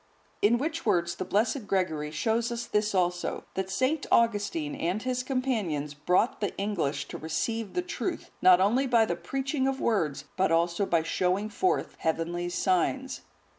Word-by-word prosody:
In 225 +4 +4
which 315 +5 -3
words 170 0 +1
the 185 - -3
blessed 215 +4 0
Gregory 160 -7 0
shows 225 +10 0
us 235 0 -3
this 210 -1 0
also, 175 -1 0
that 190 0 -3
St. 260 +9 0
Augustine 205 -10 +2
and 175 +5 -1
his 255 -1 -1
companions 220 - -1
brought 180 - +1
the 205 - -2
English 160 -9 -1
to - - -6
receive 220 +7 -2
the 360 - 0
truth, 355 0 -4
not 185 -1 +7
only 235 +8 +3
by 235 -3 +4
the 175 - -1
preaching 265 - -2
of 270 0 -1
words, 155 -11 0
but 190 -2 +2
also 170 +4 +2
by 165 -2 +2
showing 185 +5 0
forth 370 - 0
heavenly 170 +2 -1
signs. 190 +9 0
200 Hz, 165 wpm, -28 LUFS, 170-240 Hz, -, not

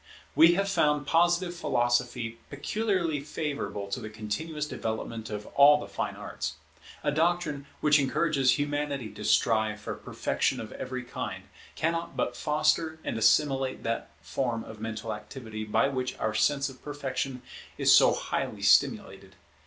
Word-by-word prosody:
We 165 +4 +7
have 195 +1 +1
found 150 -6 +2
Positive 175 +3 +2
Philosophy 120 -5 0
peculiarly 175 0 -1
favourable 145 -8 -4
to - - -2
the 110 - -7
continuous 115 +9 -4
development 110 -2 -4
of 105 -1 -5
all 145 +1 +8
the - - -6
fine - - -3
arts. 75 - -5 0.5
A - - +1
doctrine 155 -2 0
which 150 -1 +5
encourages 135 -2 +2
Humanity 145 -4 -2
to 105 - -9
strive 110 -1 +2
for 105 - -5
perfection - - -1
of - - -7
every 130 0 -5
kind, 130 +1 -5 0.3
cannot 165 +1 -2
but - - -1
foster 155 +1 +1
and - - -3
assimilate 135 -3 +2
that 115 0 -2
form 120 -4 -2
of 110 -1 -11
mental 110 0 -4
activity 110 0 -7
by 110 +6 +2
which 130 -2 -3
our 110 - -1
sense 140 +6 +2
of 135 -2 -11
perfection 135 -3 -4 0.3
is - - +5
so - - +7
highly - - -3
stimulated. 95 -1 +2
135 Hz, 145 wpm, -28 LUFS, 115-150 Hz, 0.5 s, all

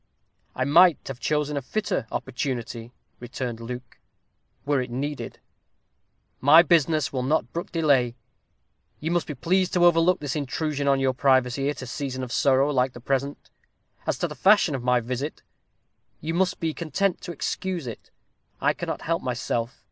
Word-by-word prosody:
"I 130 - 0
might 165 +3 +5
have 130 -2 -6
chosen 150 0 0
a 140 - -1
fitter 205 - -2
opportunity," 120 -2 -4 0.3
returned 120 -1 -5
Luke, 125 0 -8 0.7
"were 140 -2 +2
it 125 - -5
needed. 140 +4 -4 1.0
My 155 +5 +7
business 155 -3 +2
will 130 - -1
not 150 +5 0
brook 170 - -4
delay 140 -8 +2 0.8
you 160 +2 -2
must 175 -1 0
be 150 - -5
pleased 185 +7 +1
to 175 -1 +4
overlook 170 +1 +4
this 145 -1 -3
intrusion 145 0 -2
on 135 -1 +4
your 135 -1 +1
privacy, 130 +1 +2
at 145 - -4
a - - -5
season 130 +1 -4
of 125 - -6
sorrow 135 +2 +3
like 130 -2 +1
the - - -10
present. 135 +3 -3 0.6
As - - 0
to - - -1
the - - -7
fashion 200 -5 +4
of 135 - -3
my 125 -1 +3
visit, 130 +6 -4 0.8
you 160 +1 -3
must 180 +1 +1
be 160 -1 -1
content 175 +4 -1
to 175 - -6
excuse 175 0 -3
it. 115 -3 -8 0.5
I - - +2
cannot - - -5
help 165 +1 -1
myself. 125 -1 -3
140 Hz, 165 wpm, -25 LUFS, 125-165 Hz, 1.0 s, My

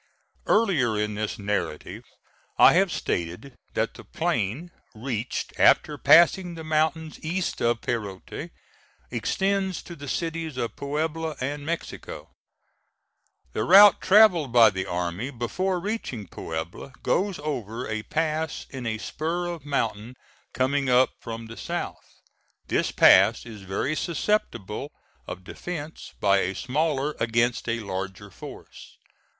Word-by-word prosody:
Earlier 160 - +3
in 105 0 -1
this 105 0 -3
narrative 100 -7 -3 0.6
I - - +8
have - - +3
stated 90 +11 -3 0.2
that - - 0
the - - -12
plain, 135 - -2 0.2
reached 115 0 -4
after - - +5
passing 175 +1 +5
the 160 - -7
mountains 155 0 0
east 175 +3 -2
of 120 0 +1
Perote, 100 -5 -4 0.6
extends 195 -1 -1
to 170 - -9
the 145 -2 -9
cities 165 -1 -3
of 115 -4 -3
Puebla 155 +2 -2
and 145 +3 -4
Mexico. 170 +1 -5 1.2
The 110 - -1
route 195 - +8
travelled 185 - +5
by 115 -3 +7
the 95 -1 -4
army 90 +7 -2
before 175 +10 -2
reaching 170 - -4
Puebla, 80 +11 -6
goes 195 0 +1
over 125 -5 -4
a 110 0 -2
pass 155 +4 -2
in 130 -3 -5
a 110 -1 -1
spur 165 +9 -3
of 170 -4 -6
mountain 115 -3 -2 0.4
coming 135 +1 0
up 125 +1 +5
from 115 0 -6
the 115 +1 -10
south. - - -6 0.5
This - - +1
pass - - +6
is 110 -4 -10
very 95 +10 -2
susceptible 145 - -2 0.4
of 90 0 -7
defence 155 - -7
by 100 -1 +4
a 95 0 -1
smaller 145 +1 0
against 115 +1 +1
a 115 0 -1
larger 95 0 -5
force. - - -12
130 Hz, 130 wpm, -25 LUFS, 110-160 Hz, 1.2 s, I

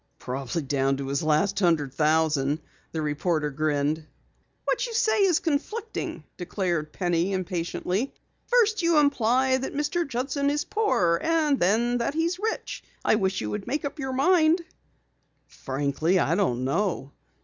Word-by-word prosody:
"Probably 135 +5 -4
down 135 0 0
to 135 -1 -4
his 140 0 0
last 160 +6 +1
hundred 160 -8 +2
thousand," 150 -1 +2 0.3
the 160 -1 -3
reporter 150 0 0
grinned. 150 +1 -1 0.6
"What - - 0
you 465 - -6
say 440 -2 +2
is 355 -5 +3
conflicting," 410 +9 -3
declared 175 -4 -2
Penny 175 +2 0
impatiently. 185 +5 -2 0.4
"First 445 -4 +3
you 335 -2 +3
imply 260 -2 +3
that 265 +1 -5
Mr. 295 +3 0
Judson 275 +2 -1
is 295 +1 0
poor, 195 - +1
and 315 -4 +2
then 235 +6 +2
that 235 +5 -1
he's 335 +3 0
rich. 445 +2 -3 0.2
I - - +4
wish 195 -3 +1
you 105 -1 -3
would 105 - -4
make 295 +2 -2
up 285 +2 -5
your 265 -1 -3
mind." 320 +4 +4 0.9
"Frankly, 140 +6 -1
I - - +2
don't 130 -12 +1
know. 140 -1 -1
195 Hz, 150 wpm, -26 LUFS, -, 0.9 s, I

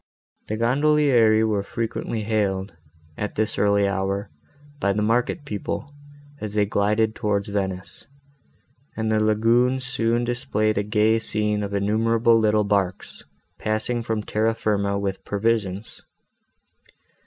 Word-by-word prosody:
The 110 - -3
gondolieri 125 -3 +3
were 105 -2 +1
frequently 115 +1 -3
hailed, 100 -4 -1 0.5
at 105 - -3
this 110 0 -1
early 100 -1 +3
hour, 100 +1 -2 0.5
by 100 -5 +1
the 105 +1 0
market 120 +7 0
people, 135 +5 -5 0.5
as 105 -1 -6
they 105 -1 +3
glided 105 +2 +1
by - - -15
towards 105 -3 -1
Venice, 95 -2 -4 0.9
and 110 0 -1
the 110 - +2
lagune 115 +4 +3
soon 120 -2 0
displayed 110 -3 0
a - - 0
gay 105 +2 +2
scene 105 -1 0
of 100 0 -3
innumerable 115 +3 +3
little 105 -1 +3
barks, 100 -3 -2 0.3
passing 110 +3 -1
from 110 -2 -2
Terra 110 +2 0
firma 100 -2 0
with 100 -1 -3
provisions. 105 -1 -2
110 Hz, 130 wpm, -23 LUFS, 100-115 Hz, 0.9 s, gondolieri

